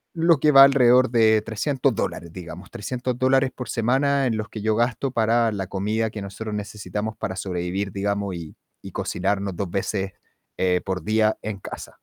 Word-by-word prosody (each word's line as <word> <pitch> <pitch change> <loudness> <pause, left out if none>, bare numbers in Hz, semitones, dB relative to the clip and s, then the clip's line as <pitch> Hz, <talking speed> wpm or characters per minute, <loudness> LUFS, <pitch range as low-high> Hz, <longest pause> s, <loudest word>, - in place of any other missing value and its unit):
lo 165 -3 +4
que 150 +1 +4
va 135 -1 +10
alrededor 130 -2 +5
de 110 -2 +4
300 125 +5 0
dólares, 85 -4 -3
digamos. 90 +1 -9
300 125 +3 -3
dólares 130 0 +3
por 125 - -6
semana 135 +4 +2
en 115 -3 +1
los 110 - -4
que 110 - -7
yo 110 +1 +1
gasto 120 +3 0
para 115 -1 +2
la 95 -3 -4
comida 105 +3 -1
que 105 -2 -7
nosotros 105 +2 -6
necesitamos 105 +1 -4
para 95 -1 -4
sobrevivir, 95 +1 -3
digamos, 100 -1 -2
y 80 -2 -8 0.2
y - - -10
cocinarnos 100 0 -2
2 95 +1 -3
veces, 95 0 -2 0.4
eh, 90 -1 +1
por 95 -1 -3
día 110 0 +2
en 105 -2 -5
casa. - - -9
110 Hz, 180 wpm, -23 LUFS, 100-125 Hz, 0.4 s, va